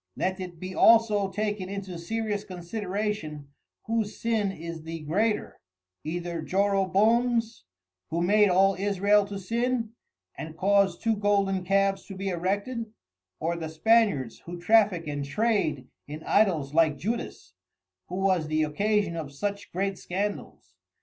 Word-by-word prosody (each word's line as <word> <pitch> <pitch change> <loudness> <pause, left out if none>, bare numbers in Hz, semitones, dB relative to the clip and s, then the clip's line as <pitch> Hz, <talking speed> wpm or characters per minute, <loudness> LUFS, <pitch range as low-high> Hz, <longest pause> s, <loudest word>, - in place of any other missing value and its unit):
Let 190 +1 -1
it 180 -3 -7
be 185 +1 -6
also 215 -2 +5
taken 205 -1 -3
into 195 -3 -6
serious 210 +3 -2
consideration, 185 -5 -4 0.4
whose 225 -2 -1
sin 220 -4 0
is 170 -2 -7
the 165 0 -7
greater, 205 +9 -1 0.4
either 170 +1 -4
Joroboam's, 210 - +1 0.4
who 170 +2 -1
made 205 +2 +4
all 195 +2 +4
Israel 200 +1 +2
to 200 0 -6
sin, 230 +3 -1 0.4
and 160 +1 -8
caused 195 -1 +2
two 225 -1 +2
Golden 200 -2 +1
Calves 195 +1 +1
to 195 - -8
be 195 +1 -3
erected, 200 +6 -2 0.5
or 165 +2 -1
the 160 -2 -5
Spaniards 160 - +2
who 175 0 -6
traffick 200 -3 +3
and 145 -1 -3
Trade 155 - 0 0.2
in 150 +2 -7
Idols 165 -10 +2
like 155 -2 +3
Judas, 225 - -4 0.5
who 180 - -6
was 185 -4 +1
the 155 0 +1
occasion 200 +4 0
of 155 -4 -5
such 200 +7 -4
great 195 +1 -2
scandals. 200 +3 -4
195 Hz, 135 wpm, -27 LUFS, 170-210 Hz, 0.5 s, also